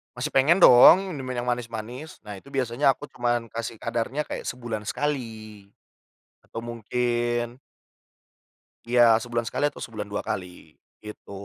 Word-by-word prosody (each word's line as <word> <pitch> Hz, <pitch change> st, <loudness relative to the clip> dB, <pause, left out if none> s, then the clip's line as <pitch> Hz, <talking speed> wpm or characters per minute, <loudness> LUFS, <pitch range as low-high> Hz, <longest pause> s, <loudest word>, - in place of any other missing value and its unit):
masih -, -, -3 dB
pengen 160 Hz, +8 st, +4 dB
dong 185 Hz, +10 st, +8 dB
minum 135 Hz, -5 st, -6 dB
minuman 130 Hz, -, -4 dB
yang -, -, -7 dB
manis-manis. 120 Hz, +4 st, -5 dB
Nah, 105 Hz, -2 st, -8 dB
itu -, -, -22 dB
biasanya 135 Hz, 0 st, +1 dB
aku 145 Hz, -, -11 dB
cuman 120 Hz, -2 st, -1 dB
kasih 115 Hz, 0 st, -5 dB
kadarnya 120 Hz, +7 st, -2 dB
kayak -, -, -6 dB
sebulan 115 Hz, -4 st, -5 dB
sekali. 110 Hz, -8 st, -4 dB, 0.8 s
Atau 115 Hz, -, -7 dB
mungkin 120 Hz, +1 st, -2 dB, 1.3 s
Iya, 120 Hz, 0 st, +4 dB, 0.2 s
sebulan 120 Hz, -1 st, -3 dB
sekali -, -, -2 dB
atau 145 Hz, -, -5 dB
sebulan 110 Hz, -3 st, -6 dB
2 100 Hz, -, -4 dB
kali, 90 Hz, -2 st, -7 dB, 0.2 s
gitu. 105 Hz, -1 st, -11 dB
120 Hz, 140 wpm, -25 LUFS, 115-130 Hz, 1.3 s, dong